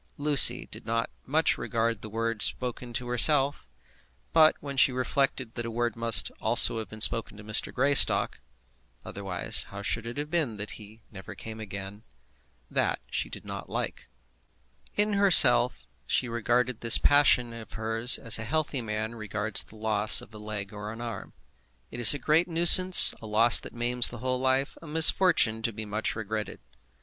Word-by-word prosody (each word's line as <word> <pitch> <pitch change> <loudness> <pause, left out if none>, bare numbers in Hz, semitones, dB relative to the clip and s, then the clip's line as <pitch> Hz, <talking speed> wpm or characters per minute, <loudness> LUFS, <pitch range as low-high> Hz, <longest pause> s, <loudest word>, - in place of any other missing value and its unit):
Lucy 145 -1 +4
did - - -10
not 115 +1 -4 0.2
much 155 +4 0
regard 115 -2 -4
the 110 - -9
word 115 0 -5
spoken 125 -1 0
to 125 +1 -5
herself; 135 - +2 0.7
but 155 -1 +4
when 140 -1 -9
she 135 - +3
reflected 130 -1 -3
that 120 - -6
a 115 - -7
word 120 0 -4
must 115 -3 +1
also 115 0 +5
have 110 -3 -9
been 110 - -12
spoken 110 -1 +3
to 105 - -13
Mr. 110 0 +2
Greystock, 140 +2 +2 0.7
otherwise 95 -3 -1
how 100 0 -10
should 115 +3 -4
it 120 - -9
have 150 +1 -7
been 150 -11 -3
that 105 +1 -8
he 110 +1 -15
never 95 -3 -12
came 110 0 -11
again? 100 -1 -10 0.7
that - - -3
she - - -3
did - - -12
not - - -9
like. - - -7 0.9
In 210 0 -1
herself 195 - +3 0.2
she 130 - -2
regarded 120 +1 -3
this 115 -1 +4
passion 130 -4 +1
of 115 -3 -13
hers 115 +2 0
as 115 -1 +4
a - - -6
healthy 145 +2 -4
man 110 0 -6
regards 105 -1 -3
the - - -18
loss 110 -1 +2
of - - -12
a 105 - -12
leg 105 -1 -8
or 105 +1 -9
an 115 - -11
arm. 120 -1 -9 0.6
It 120 - -9
is 120 - +6
a - - -5
great 155 +4 0
nuisance, 175 +2 +7
a 110 - -10
loss 115 +3 +3
that - - -11
maims 120 +1 -1
the 120 - -8
whole 130 +2 -4
life, 130 +2 -2
a 165 - -14
misfortune 160 -7 +2
to 115 - -3
be 110 0 -9
much 105 +1 -5
regretted. 110 -1 -7
115 Hz, 180 wpm, -25 LUFS, 110-130 Hz, 0.9 s, nuisance